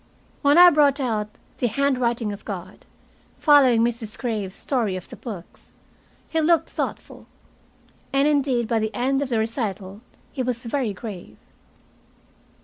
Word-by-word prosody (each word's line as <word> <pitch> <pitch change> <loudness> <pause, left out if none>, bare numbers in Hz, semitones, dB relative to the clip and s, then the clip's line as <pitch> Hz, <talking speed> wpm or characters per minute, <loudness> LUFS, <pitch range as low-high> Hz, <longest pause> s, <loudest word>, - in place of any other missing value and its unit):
When 285 +2 +4
I 355 0 +9
brought 290 -2 +3
out 220 -5 -1 0.3
"The 245 - +1
Handwriting 240 -3 0
of 200 - -10
God," 190 -2 -8 0.5
following 265 -6 +5
Mrs. 230 -2 -2
Graves's 215 -6 -3
story 230 -8 -1
of 185 - -7
the - - -9
books, 200 -8 -10 0.5
he 320 - 0
looked 330 +1 +2
thoughtful. - - -5 0.8
And 275 +1 +3
indeed 270 -5 +1
by 230 -1 +1
the 220 0 -3
end 270 +3 0
of 280 - -2
the 235 - 0
recital 215 -3 -3 0.3
he 270 - -4
was 245 -2 -2
very 240 -2 -1
grave. 185 - -9
235 Hz, 145 wpm, -23 LUFS, 215-275 Hz, 0.8 s, I